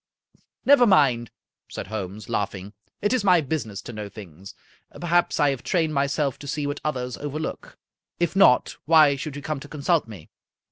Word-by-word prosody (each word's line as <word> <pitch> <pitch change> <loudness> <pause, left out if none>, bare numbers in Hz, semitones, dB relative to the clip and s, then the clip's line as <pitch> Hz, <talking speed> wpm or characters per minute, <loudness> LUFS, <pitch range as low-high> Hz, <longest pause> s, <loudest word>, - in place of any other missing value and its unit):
" - - -37
" - - -50
Never 270 -3 +6
mind," 130 - +3 0.4
said - - -6
Holmes, 105 -1 -6
laughing, 100 -2 -3
" - - -45
it 205 - +2
is 255 - +1
my 180 -3 +5
busi 155 -3 -2
ness 100 -2 -8
to 120 - -8
know 105 -1 -6
things. 95 -2 -12 0.4
Perhaps 175 0 +1
I 145 -2 +4
have 135 -3 -5
trained 160 -4 0
myself 140 -1 0
to 145 - -9
see 150 +1 -2
what 145 0 -4
others 125 -5 -3
overlook. 150 +2 -6 0.4
If 175 +1 0
not, 195 -10 +4
why 155 -3 +6
should 140 +1 -6
you 145 - -7
come 155 -1 -3
to 140 - -11
consult 150 0 0
me?" 100 -8 -12
140 Hz, 195 wpm, -24 LUFS, 110-160 Hz, 0.4 s, Never